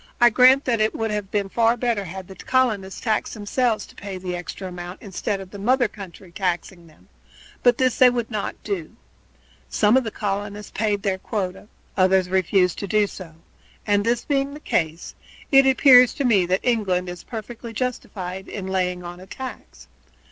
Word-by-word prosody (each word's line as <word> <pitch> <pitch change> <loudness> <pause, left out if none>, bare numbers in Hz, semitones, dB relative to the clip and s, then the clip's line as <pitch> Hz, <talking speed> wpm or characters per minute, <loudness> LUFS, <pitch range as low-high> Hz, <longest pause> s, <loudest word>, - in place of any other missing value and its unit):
I 240 0 +6
grant 260 +4 +6
that 235 -4 +1
it 215 - +1
would 225 -1 -2
have 210 -2 -3
been 200 -1 -1
far 230 +3 +2
better 230 -4 -1
had 190 +1 -8
the 190 - -10
colonists 210 -3 0
taxed 220 0 -1
themselves 220 +2 0
to - - -17
pay 200 -2 -7
the 180 -1 -4
extra 180 +2 -6
amount, 180 +1 -8
instead 200 0 -3
of 190 -1 -10
the 200 - -9
mother 245 +4 +2
country 190 -3 -11
taxing 175 -1 -3
them; 155 - -22 0.5
but 245 -1 +4
this 255 -2 +1
they 255 - +8
would 240 -1 -3
not 210 -2 -3
do. 190 -7 -4 0.7
Some 210 +3 +3
of 260 - +4
the 225 - -3
colonists 205 0 -4
paid 205 -2 -1
their 190 -2 0
quota, 195 -1 -4 0.3
others 185 -1 +3
refused 185 -1 +2
to 200 - -4
do 210 +2 +3
so, 180 -5 -10 0.5
and 205 -1 +2
this 235 +2 0
being 280 0 0
the - - -9
case, 165 - -2 0.4
it 270 -1 +7
appears 255 -2 +7
to 280 - -1
me 200 -7 +3
that 185 +2 +1
England 195 -7 +1
is 180 -1 -7
perfectly 230 +1 -7
justified 195 -6 -4
in 195 - -6
laying 180 -1 -1
on 175 0 -8
a 185 - -12
tax. 260 +5 -9
205 Hz, 185 wpm, -23 LUFS, 185-235 Hz, 0.7 s, they